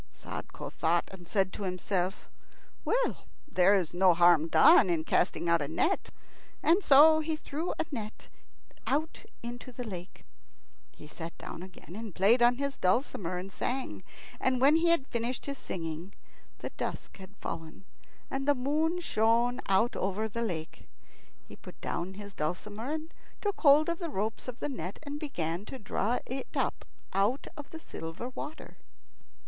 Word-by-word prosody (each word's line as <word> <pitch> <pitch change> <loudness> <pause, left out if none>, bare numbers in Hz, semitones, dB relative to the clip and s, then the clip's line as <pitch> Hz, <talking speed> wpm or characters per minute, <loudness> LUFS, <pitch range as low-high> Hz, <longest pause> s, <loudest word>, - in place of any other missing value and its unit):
Sadko - - -7
thought, 170 +1 +1
and 180 -3 -11
said 190 +1 +1
to - - -7
himself: 185 0 -2 0.6
"Well, - - 0 0.2
there 195 -6 +5
is 180 -5 0
no 180 -1 +5
harm 170 -2 +6
done 165 +3 +7
in 165 -2 +1
casting 165 +1 +1
out 170 -1 +4
a 145 - -1
net." 315 - 0 0.7
So 315 0 +8
he 315 0 -1
threw 310 +2 -3
a - - 0
net 220 -5 -6 0.6
out 315 +8 -1 0.2
into 240 +1 -6
the 245 0 -6
lake. 185 -5 -8 0.7
He - - -14
sat 165 +2 -8
down - - -7
again 180 -1 -11
and 220 -4 -7
played 215 +6 +5
on 240 +1 +6
his 280 +1 -3
dulcimer 185 - +1
and 185 +2 -6
sang, 255 +6 -3 0.4
and 260 -1 +2
when 285 +5 +6
he 335 +1 +3
had 335 -6 +3
finished 235 0 -2
his 280 -1 -4
singing 165 +1 -5 0.4
the - - -6
dusk - - -5
had 195 +1 -13
fallen 160 +3 -6 0.5
and 270 +1 -2
the 290 - +5
moon 310 +7 0
shone 235 -1 +2
over 200 0 +1
the 230 +2 -4
lake. 170 -8 -4 0.6
He - - -11
put - - -13
down 180 +3 -3
his 205 0 -9
dulcimer 205 - -3
and 315 +1 -5 0.3
took 410 -1 -2
hold 295 0 +7
of 340 0 -1
the 340 -3 -3
ropes 220 -1 -3
of 250 0 -6
the - - 0
net, 195 - -5
and 290 0 -5
began 175 - -3
to 265 - -7
draw 225 +1 0
it 260 +1 -4
up - - -1 0.3
out 205 +8 +1
of 295 -1 -9
the 325 - -8
silver 165 - -6
water. 295 +4 -8
220 Hz, 165 wpm, -30 LUFS, 180-280 Hz, 0.7 s, So